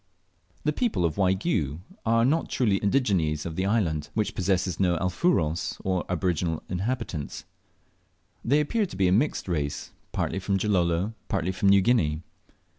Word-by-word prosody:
The 150 - +1
people 225 - 0
of 80 - -1
Waigiou 90 - +1 0.3
are 115 +1 +4
not 155 +5 +1
truly 105 -6 +2
indigenes 95 - +1
of 85 -2 -4
the 95 +2 0
island, 80 -9 0
which 110 -1 0
possesses 95 -2 0
no 90 -3 +2
"Alfuros," 90 - 0
or 95 -2 0
aboriginal 85 -2 -1
inhabitants. 95 - -3 1.0
They 145 +5 +3
appear 205 +8 0
to - - -9
be 95 -1 +3
a - - +3
mixed 120 +6 +1
race, 75 -5 -2 0.2
partly 95 - -1
from 95 +1 0
Gilolo, 95 0 +1
partly 95 -3 -1
from 95 +1 +1
New 100 0 +6
Guinea. 85 -9 +2
95 Hz, 150 wpm, -26 LUFS, 85-115 Hz, 1.0 s, New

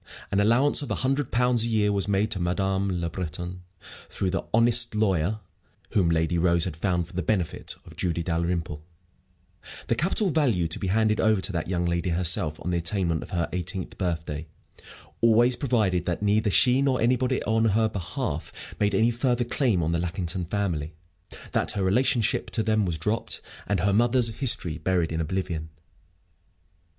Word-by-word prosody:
An 100 - +2
allowance 120 +9 +4
of 145 - -6
a - - 0
hundred 135 0 0
pounds 125 -1 +2
a - - 0
year 105 -3 +2
was 100 -1 0
made 100 +2 +1
to 100 - 0
Madame 95 +2 0
Le 85 - -1
Breton, 90 +1 -5 0.5
through 95 -2 -2
the 95 - -1
"honest 115 0 +3
lawyer" 105 -1 +1 0.5
whom 95 -5 +2
Lady 80 +1 +1
Rose 85 -1 +3
had - - -4
found, 90 0 0
for 95 - -16
the 90 - -2
benefit 90 -4 -2
of - - -13
"Julie 85 -1 -1
Dalrymple," 85 -2 -2 1.0
the - - 0
capital 175 - +1
value 120 - +1
to 80 - -2
be 95 - -3
handed 110 +2 +2
over 110 -2 +3
to 100 - -2
that 85 -4 -3
young 90 -1 -1
lady 85 +1 -1
herself 85 -2 +1
on 90 - -1
the 85 - +1
attainment 85 -2 0
of - - -9
her 85 -4 -1
eighteenth 90 +1 -2
birthday 80 -4 -3 0.7
always 115 +2 +4
provided 110 - 0
that 90 +3 -2
neither 105 +1 +2
she 125 +6 +4
nor 135 -2 +1
anybody 125 +2 +1
on 110 +1 +1
her 110 +1 +3
behalf 95 - -5
made 105 -1 +1
any 115 +4 +3
further 120 +1 0
claim 120 - 0
on 80 - 0
the 85 - 0
Lackington 90 0 -2
family, 85 -5 -2 0.6
that - - +1
her 100 -2 -1
relationship 120 +4 +1
to 110 - -1
them 110 -2 +1
was 85 -2 -2
dropped, 105 +8 -2 0.3
and 100 0 0
her 100 -1 +2
mother's 120 +2 +3
history 90 - +1
buried 85 0 0
in 80 0 -1
oblivion. 80 -2 -3
95 Hz, 180 wpm, -26 LUFS, 85-115 Hz, 1.0 s, allowance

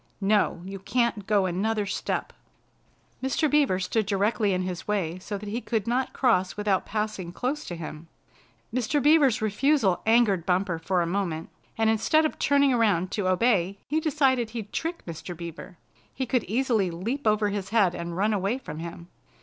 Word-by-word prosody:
"No, 200 -4 +1
you 195 +1 -6
can't 230 -1 0
go 205 -3 +3
another 205 +4 0
step." 200 - -3 0.9
Mr. 265 +4 +1
Beaver 285 -11 +2
stood 200 +3 -1
directly 205 +1 +1
in 185 0 0
his 185 0 -5
way 185 -5 -1
so 205 +2 -5
he 210 +4 -4
could 225 -5 -1
not 250 +3 0
cross 200 -8 +1
without 205 -2 0
passing 210 -5 -3
close 265 +10 -2
to 175 - -5
him. 160 -1 -8 0.7
Mr. 255 +4 +1
Beaver's 285 -6 +4
refusal 215 - +2
angered 220 -6 +4
Bumper 180 -1 0
for 175 +2 0
a - - -1
moment, 170 -3 -2 0.3
and 225 0 +2
instead 225 +8 +3
of 310 - -3
turning 280 -1 +3
around 200 -6 +2
to 205 -3 -1
obey 195 -1 +2
he 305 +3 +1
decided 270 -7 +1
he'd 220 -3 -7
trick 335 +1 -3
Mr. 170 +1 -7
Beaver. 170 +2 -8 0.3
He 260 - -3
could 245 -2 0
easily 225 -3 +1
leap 220 +11 -3
over 210 -1 +3
his 200 -2 -4
head 205 -5 +3
and 170 0 -5
run 210 +3 +2
away 200 +4 0
from 160 - -8
him. 170 +1 -8
205 Hz, 175 wpm, -26 LUFS, 185-240 Hz, 0.9 s, Beaver's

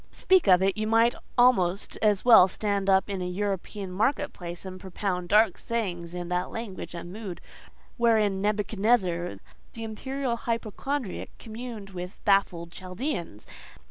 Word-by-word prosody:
Speak 375 - +3
of 185 -1 +6
it! 195 0 +2
you 215 0 -2
might 230 +2 +4 0.2
almost 200 -7 +3
as 210 -1 +2
well 225 -7 +9
stand 200 0 -1
up 190 0 +4
in 195 -2 -3
an 180 0 -3
European 200 -1 -3
market 260 +9 0
place, 175 0 -7
and 185 0 -7
propound 180 -1 -3
dark 215 +2 +4
sayings 180 -7 -3
in 175 -1 -4
that 180 +1 -1
language 195 -6 -6
and 175 +1 -7
mood 195 -5 -6 0.6
wherein 215 -5 +3
Nebuchadnezzar, 205 -3 +1 0.4
the 230 - -7
imperial 250 +3 -3
hypochondriac, 230 +1 -3
communed 225 -3 -8
with 180 +1 -6
his - - -29
baffled 185 -4 +2
Chaldeans. 180 - -5
200 Hz, 145 wpm, -27 LUFS, 180-225 Hz, 0.6 s, well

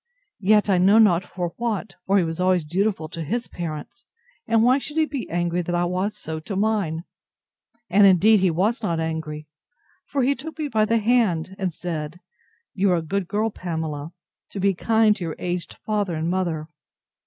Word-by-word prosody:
—Yet 210 +1 +4
I 190 -3 +3
know 195 +4 +5
not 190 -5 +5
for 175 -2 -5
what: 220 -4 -2
for 195 +1 +4
he 185 - +4
was 165 0 -4
always 180 -3 +2
dutiful 185 0 -1
to 165 - -6
his 235 +10 -2
parents; 165 +7 -7 0.4
and 225 -1 +3
why 255 +3 +4
should 300 +3 -7
he 315 - +4
be 280 -5 -5
angry 175 +1 0
that 175 0 -2
I 175 0 +1
was 185 +4 -2
so 160 -5 -5
to 195 +6 -6
mine? 195 -6 0 0.8
And 200 +2 +6
indeed 200 +4 +5
he 190 -1 +3
was 200 +9 0
not 170 -6 -1
angry; 160 -2 -4 0.6
for 275 -2 0
he 270 +3 +3
took 315 +3 -8
me 305 -2 -3
by 215 -3 +2
the 230 +2 +2
hand, 210 -7 +1
and 190 -2 -1
said, 160 -1 -5 0.5
You 195 0 +2
are - - +3
a - - -1
good 190 +3 -2
girl, 215 +3 0
Pamela, 160 -4 -4 0.4
to 200 - -6
be 195 +1 +2
kind 220 +3 +3
to 190 - -5
your 165 -2 -4
aged 175 -1 -4
father 205 -5 -1
and 160 +1 -2
mother. 170 -4 -1
185 Hz, 195 wpm, -23 LUFS, 165-215 Hz, 0.8 s, And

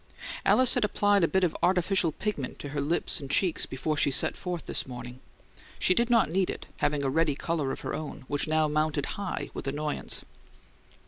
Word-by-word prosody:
Alice 255 -1 +7
had - - +1
applied 205 -2 +2
a - - +5
bit 190 +4 +1
of 175 - +1
artificial 180 -1 +2
pigment 150 -7 -4
to 145 - -7
her 145 0 -2
lips 155 +5 +1
and 140 - -8
cheeks 175 +4 +1
before 150 +4 -2
she 140 - +2
set 135 - +2
forth 180 -3 -5
this - - -2
morning; 125 0 -8 0.6
she - - +4
did 235 +5 +1
not 235 -2 +4
need 185 +3 0
it, - - -5
having 145 -1 0
a 135 - +1
ready 160 -1 +2
colour 155 -3 -2
of - - -6
her - - -4
own, 150 -3 -6
which 145 +1 0
now 155 0 +2
mounted 150 -1 0
high 200 -2 -4
with - - -6
annoyance. 150 +2 -2
155 Hz, 200 wpm, -28 LUFS, 145-185 Hz, 0.6 s, Alice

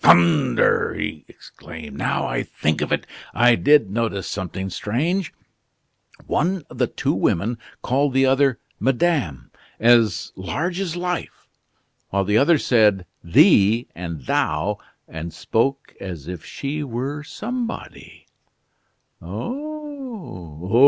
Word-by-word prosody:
"Thunder!" 85 -7 +4
he 75 -3 -4
exclaimed. 80 -3 -11
"Now - - 0
I - - -1
think 75 0 -1
of - - -2
it, - - 0 0.3
I 120 +2 +6
did 140 -5 +4
notice 110 -3 -1
something 95 0 -4
strange. 155 - -1 0.9
One 180 +2 0
of - - -10
the - - +3
two - - -1
women 115 +7 0 0.2
called 140 +2 +1
the 135 0 +5
other 135 -1 +3 0.2
'Madame' 130 - 0 0.3
as 115 -5 +4
large 160 - -2
as 180 -4 -2
life, 180 0 -4 0.6
while 100 0 +1
the 105 +3 +3
other 155 +4 +5
said 105 -8 +3 0.2
'thee' 115 - +5
and 85 -4 -6
'thou,' 90 +8 0 0.3
and 80 +1 -6
spoke 135 +10 -1
as 85 -7 -7
if 90 -3 -6
she 145 +2 -4
were 135 +3 -3
somebody." 235 +10 -6 1.0
"Oh! 200 - -4
115 Hz, 120 wpm, -22 LUFS, 90-150 Hz, 1.0 s, I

